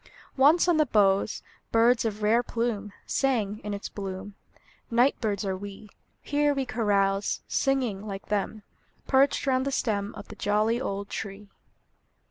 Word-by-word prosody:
Once 300 +7 +5
on 345 -3 +4
the 305 - +4
boughs 200 -2 +2 0.3
Birds 230 +1 +4
of 215 -1 -3
rare 225 +3 +4
plume 230 -4 -2
Sang, 220 -7 0
in 210 - -4
its 200 0 -4
bloom; 195 0 -6 0.6
Night 245 +4 +4
birds 205 -2 -1
are 190 -1 -1
we; 200 +2 -9 0.3
Here 290 0 +1
we 270 -1 -1
carouse, 200 -4 +1
Singing, 255 -8 0
like 195 -1 -6
them, 210 +1 -2 0.4
Perched 270 +2 +3
round 260 -1 +2
the 275 - -2
stem 210 -5 -1
Of 205 -1 -10
the 210 - -9
jolly 215 +4 +1
old 200 -5 -3
tree. 200 -1 -6
215 Hz, 150 wpm, -27 LUFS, 200-255 Hz, 0.6 s, Once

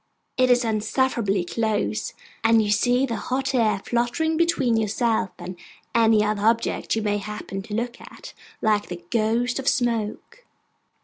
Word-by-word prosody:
It 255 0 +3
is 245 -1 +4
insufferably 215 -3 0
close; 215 +1 -1 0.3
and 225 0 +5
you 205 - -1
see 245 +5 +3
the 235 -4 -3
hot 270 +1 -2
air 215 -5 +2
fluttering 240 +7 0
between 315 -8 +2
yourself 220 -1 0
and 185 - -7 0.4
any 220 -2 +4
other 210 -1 -1
object 230 +2 +1
you 220 - -1
may 205 -1 0
happen 205 -1 -6
to 205 +2 -6
look 240 +1 -3
at, - - -12 0.3
like 210 -1 +2
the 175 -1 -8
ghost 235 +3 +1
of 270 - -5
smoke. 235 - -1
225 Hz, 150 wpm, -24 LUFS, 210-245 Hz, 0.4 s, and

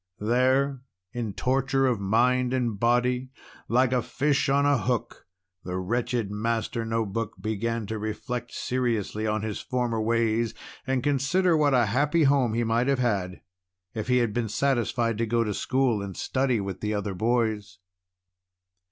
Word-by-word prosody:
There, 130 +4 +2 0.3
in 115 -4 -3
torture 135 +3 +1
of 125 -5 +1
mind 125 +5 +2
and 120 -5 -1
body 125 +2 +1 0.4
like 125 +2 +2
a 125 - +2
fish 135 +4 0
on 140 +1 +3
a 145 -3 +3
hook 120 -4 -3 0.4
the 90 0 -4
wretched 115 +2 -1
Master 115 +2 -2
No 115 0 -1
Book 105 +2 -4
began 110 +1 -2
to 110 +1 -4
reflect 120 +3 -4
seriously 115 -4 -1
on 110 0 -1
his 110 -2 -3
former 120 -3 -1
ways, 115 0 +1 0.3
and 130 -2 0
to 145 - +2
consider 165 +6 +2
what 145 -3 +3
a 120 -2 +4
happy 145 +9 +2
home 135 -5 +3
he 120 - +1
might 115 +2 +1
have 140 -1 +2
had 100 -7 -1 0.5
if 110 +1 -4
he 125 0 +3
had 120 -4 +1
been 115 -1 -1
satisfied 120 -3 0
to 115 - 0
go 115 +1 +2
to 105 -2 -2
school 130 -2 +1
and 100 -2 -6
study 130 -3 0
with 95 -2 -4
the 105 0 -1
other 100 -1 -2
boys. 110 -2 -1
120 Hz, 165 wpm, -26 LUFS, 110-130 Hz, 0.5 s, a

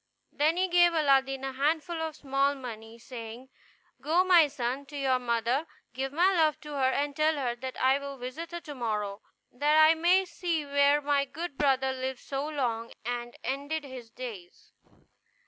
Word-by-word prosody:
Then 310 +4 +1
he 375 +1 +2
gave 350 -1 +5
Aladdin 270 -3 +2
a 270 - -2
handful 315 +4 0
of 320 -2 -3
small 275 0 0
money, 230 -4 -9
saying, 235 +1 -9 0.5
"Go, 320 +6 +3
my 350 -4 +6
son, 265 +1 -3
to 290 0 -8
your 265 -2 +1
mother, 240 +5 0 0.3
give 265 +2 -3
my 355 +6 +3
love 315 -3 +2
to 300 - -9
her, 270 -2 +1
and 285 +1 -1
tell 310 +1 +2
her 250 -4 -2
that 260 +1 -6
I 265 +2 +3
will 280 -1 -7
visit 255 +7 -6
her 345 0 -5
to 300 - -8
morrow, 210 -5 -3 0.3
that 295 +4 +2
I 315 +1 +7
may 355 +4 +3
see 345 -4 -2
where 285 +1 +3
my 285 -1 +2
good 330 +2 -6
brother 265 -2 +2
lived 260 -1 -4
so 275 +1 -3
long, 235 -6 -2
and 240 0 -4
ended 285 +4 -3
his 255 -4 -9
days." 220 -8 -10
275 Hz, 180 wpm, -29 LUFS, 255-310 Hz, 0.5 s, I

